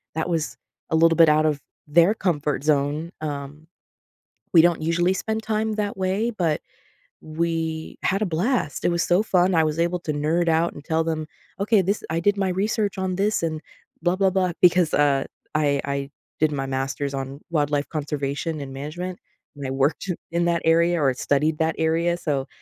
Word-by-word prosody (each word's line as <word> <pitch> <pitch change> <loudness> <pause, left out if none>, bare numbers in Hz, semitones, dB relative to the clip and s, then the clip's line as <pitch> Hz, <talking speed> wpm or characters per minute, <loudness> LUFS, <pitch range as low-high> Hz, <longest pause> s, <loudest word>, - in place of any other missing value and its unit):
that 160 - -1
was 160 -2 -2 0.3
a 160 - +2
little 165 0 +5
bit 165 -2 +6
out 155 +1 +4
of 150 -2 0 0.3
their 170 +7 +5
comfort 150 -8 -1
zone, 150 +3 +1
um, 145 +1 -6 0.9
we 165 - +9
don't 170 -2 +2
usually 175 +3 +2
spend 220 +3 -3
time 220 0 -1
that 205 -2 -2
way, 190 +5 0
but 170 -8 -1 0.6
we 160 0 -3
had 195 +3 +1
a - - +1
blast, 180 - -1
it - - +3
was 170 -1 +1
so 180 +3 +3
fun, 185 -3 +2
I 160 -1 +4
was 155 0 -1
able 175 +1 0
to 155 - -3
nerd 165 +4 +1
out 165 +1 +2
and 145 - -11
tell 160 +1 0
them, 155 -1 -2 0.3
"Okay, 205 0 +3
this 200 +4 -1
I 165 +1 0
did 205 +4 +2
my 195 -2 0
research 200 +2 -1
on 185 -1 -1
this 200 -2 0
and 155 -1 -2 0.4
blah, 175 +2 +2
blah, 190 -1 +2
blah." 185 -2 +1
Because, 175 -2 +4
uh, 145 -2 +3 0.3
I 145 -2 +1
I 140 0 -3 0.3
did 155 -1 +3
my 135 -1 -2
master's 135 +1 -2
on 135 +1 -5
wildlife 145 -2 0
conservation 150 0 -3
and 135 -1 -7
management, 175 +6 -5 0.4
and 140 -2 -5
I 130 - -3
worked 140 +8 0 0.2
in 170 0 +1
that 170 -1 +1
area 170 0 +3
or 135 -2 +3
studied 150 +4 0
that 160 0 0
area, 165 +2 +1
so 140 -5 -2
165 Hz, 190 wpm, -23 LUFS, 150-180 Hz, 0.9 s, we